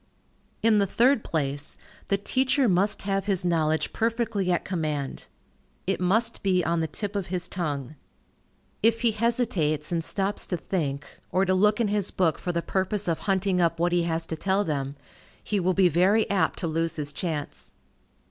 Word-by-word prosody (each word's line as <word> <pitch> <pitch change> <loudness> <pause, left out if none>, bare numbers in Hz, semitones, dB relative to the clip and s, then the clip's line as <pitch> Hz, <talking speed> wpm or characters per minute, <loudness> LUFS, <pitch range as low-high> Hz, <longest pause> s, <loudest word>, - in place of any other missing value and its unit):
In 220 -2 +5
the 200 - +2
third 240 +4 +3
place, 145 -2 -2 0.3
the 200 - +2
teacher 260 +5 +1
must 195 +2 +1
have 195 -1 -1
his 195 -3 0
knowledge 160 -2 +1
perfectly 225 -4 0
at 175 - 0
command. 155 -6 -3 0.6
It 195 - 0
must 225 +6 +1
be 185 -3 +2
on 170 +1 +1
the 160 - 0
tip 205 +4 -4
of 200 -3 -2
his 180 0 -2
tongue. 150 -6 -3 0.9
If 230 +1 +3
he 235 -2 +4
hesitates, 205 - 0
and 165 -1 0
stops 195 +4 -1
to 180 - -1
think, 150 -6 -2 0.3
or 190 +1 +2
to 185 - +2
look 210 +3 +3
in 225 -3 +2
his 205 -2 0
book 170 -4 +1
for 180 - -2
the 170 -1 -2
purpose 190 +1 -1
of 165 -2 0
hunting 190 -1 +2
up 165 -1 +1
what 175 +1 +2
he 175 0 +3
has 165 0 -1
to 160 - -4
tell 195 +5 +1
them, 140 -5 -3 0.5
he 210 - -1
will 185 0 +1
be 190 -2 +5
very 185 +7 +3
apt 200 - +1
to 170 - -2
lose 165 +1 0
his 145 -2 -1
chance. 155 -5 -4
185 Hz, 185 wpm, -26 LUFS, 165-205 Hz, 0.9 s, In